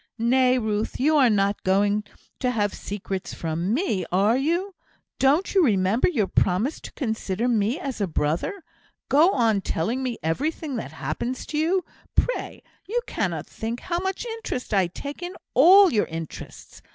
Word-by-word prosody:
"Nay, 250 Hz, +2 st, +3 dB
Ruth, 215 Hz, -2 st, -2 dB
you 305 Hz, +4 st, +3 dB
are 260 Hz, -4 st, +5 dB
not 200 Hz, -1 st, +1 dB
going 205 Hz, +2 st, +2 dB, 0.4 s
to 250 Hz, -, +1 dB
have 205 Hz, -4 st, 0 dB
secrets 195 Hz, -2 st, -5 dB
from 165 Hz, +3 st, -2 dB
me, 235 Hz, -, 0 dB
are 200 Hz, +5 st, +3 dB
you? 340 Hz, +9 st, 0 dB, 0.5 s
Don't 285 Hz, +8 st, +3 dB
you 385 Hz, -3 st, +5 dB
remember 205 Hz, -, +2 dB
your 240 Hz, -, +1 dB
promise 190 Hz, -, 0 dB
to -, -, -9 dB
consider 220 Hz, -, -2 dB
me 230 Hz, -, +1 dB
as 270 Hz, -, -5 dB
a 200 Hz, -, +1 dB
brother? 165 Hz, -, -2 dB, 0.5 s
Go 300 Hz, +6 st, +6 dB
on 225 Hz, -, +2 dB
telling 215 Hz, +10 st, -1 dB
me 250 Hz, -3 st, -2 dB
everything 285 Hz, -, -2 dB
that -, -, -5 dB
happens 255 Hz, +2 st, -4 dB
to 300 Hz, -, -4 dB
you, 350 Hz, +3 st, +1 dB, 0.3 s
pray; -, -, -1 dB, 0.2 s
you 465 Hz, +5 st, 0 dB
cannot -, -, -2 dB
think 230 Hz, +2 st, -5 dB
how 345 Hz, -1 st, -2 dB
much 380 Hz, +4 st, -3 dB
interest 450 Hz, -, -5 dB
I 190 Hz, -3 st, +3 dB
take 280 Hz, -, -8 dB
in 355 Hz, +1 st, -5 dB, 0.2 s
all 365 Hz, +6 st, +7 dB
your 210 Hz, -, +2 dB
interests. 165 Hz, -1 st, -8 dB
240 Hz, 165 wpm, -24 LUFS, 200-315 Hz, 0.5 s, all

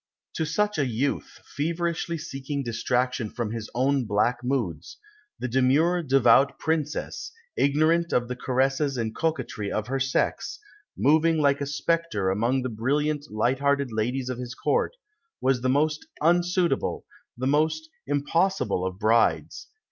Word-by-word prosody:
To 160 Hz, -, -2 dB
such 210 Hz, +4 st, 0 dB
a 140 Hz, -, +2 dB
youth, 125 Hz, +4 st, -2 dB
feverishly 170 Hz, +2 st, -2 dB
seeking 140 Hz, -2 st, -4 dB
distraction 120 Hz, 0 st, -1 dB
from 115 Hz, -1 st, -4 dB
his 115 Hz, -1 st, -5 dB
own 135 Hz, +1 st, +2 dB
black 115 Hz, +4 st, +1 dB
moods, 110 Hz, -, -2 dB, 0.4 s
the 125 Hz, +1 st, -3 dB
demure, 135 Hz, +8 st, +3 dB
devout 135 Hz, -2 st, +4 dB
Princess, 155 Hz, -2 st, -2 dB, 0.2 s
ignorant 155 Hz, +4 st, +2 dB
of 120 Hz, -1 st, +1 dB
the 125 Hz, -, -4 dB
caresses 135 Hz, +2 st, 0 dB
and 115 Hz, -2 st, -2 dB
coquetry 155 Hz, -10 st, -2 dB
of 110 Hz, -, -1 dB
her 135 Hz, +3 st, -2 dB
sex, 135 Hz, 0 st, -1 dB, 0.4 s
moving 160 Hz, +3 st, +4 dB
like 140 Hz, -2 st, +2 dB
a 140 Hz, -, -1 dB
spectre 145 Hz, -, 0 dB
among 120 Hz, +6 st, +1 dB
the 130 Hz, -, -2 dB
brilliant, 145 Hz, +6 st, -1 dB
light 120 Hz, +5 st, 0 dB
hearted 140 Hz, -2 st, +1 dB
ladies 125 Hz, +4 st, -1 dB
of 125 Hz, -1 st, -4 dB
his 125 Hz, 0 st, -6 dB
Court, 480 Hz, +1 st, 0 dB, 0.4 s
was 130 Hz, -1 st, +1 dB
the 130 Hz, -, +1 dB
most 150 Hz, +3 st, +1 dB
unsuitable, 175 Hz, -1 st, +1 dB, 0.3 s
the 130 Hz, -, -3 dB
most 155 Hz, +3 st, +1 dB, 0.2 s
impossible 145 Hz, -, +1 dB
of 95 Hz, 0 st, -3 dB
brides. 110 Hz, +2 st, +1 dB
135 Hz, 140 wpm, -26 LUFS, 120-155 Hz, 0.4 s, devout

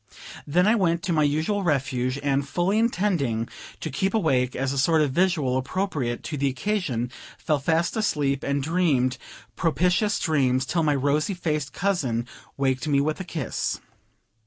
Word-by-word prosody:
Then 175 Hz, +5 st, +3 dB
I 215 Hz, -, +5 dB
went 170 Hz, -6 st, +1 dB
to 175 Hz, -, 0 dB
my 155 Hz, -, +3 dB
usual 155 Hz, +8 st, +1 dB
refuge, 135 Hz, -5 st, 0 dB
and, 140 Hz, 0 st, 0 dB
fully 185 Hz, +7 st, +1 dB
intending 175 Hz, -, 0 dB, 0.3 s
to -, -, -4 dB
keep 190 Hz, +10 st, 0 dB
awake, 130 Hz, -, +1 dB
as 135 Hz, +1 st, -1 dB
a 140 Hz, -, -1 dB
sort 160 Hz, +2 st, +4 dB
of 145 Hz, -, 0 dB
vigil 155 Hz, -6 st, +2 dB
appropriate 135 Hz, -4 st, -2 dB
to 150 Hz, -, -4 dB
the 140 Hz, 0 st, +1 dB
occasion, 130 Hz, -, -2 dB, 0.3 s
fell 150 Hz, -2 st, 0 dB
fast 165 Hz, +4 st, +1 dB
asleep 145 Hz, -11 st, 0 dB
and 140 Hz, 0 st, -1 dB
dreamed 140 Hz, -6 st, +1 dB, 0.4 s
propitious 180 Hz, +5 st, +1 dB
dreams 135 Hz, -5 st, +1 dB
till 165 Hz, +6 st, 0 dB
my 150 Hz, -2 st, +2 dB
rosy 145 Hz, +7 st, +1 dB
faced 150 Hz, -4 st, -2 dB
cousin 140 Hz, -12 st, -1 dB, 0.3 s
waked 135 Hz, +1 st, 0 dB
me 140 Hz, -2 st, +3 dB
with 155 Hz, +4 st, 0 dB
a -, -, -3 dB
kiss. 160 Hz, -7 st, -3 dB
150 Hz, 160 wpm, -25 LUFS, 135-180 Hz, 0.4 s, I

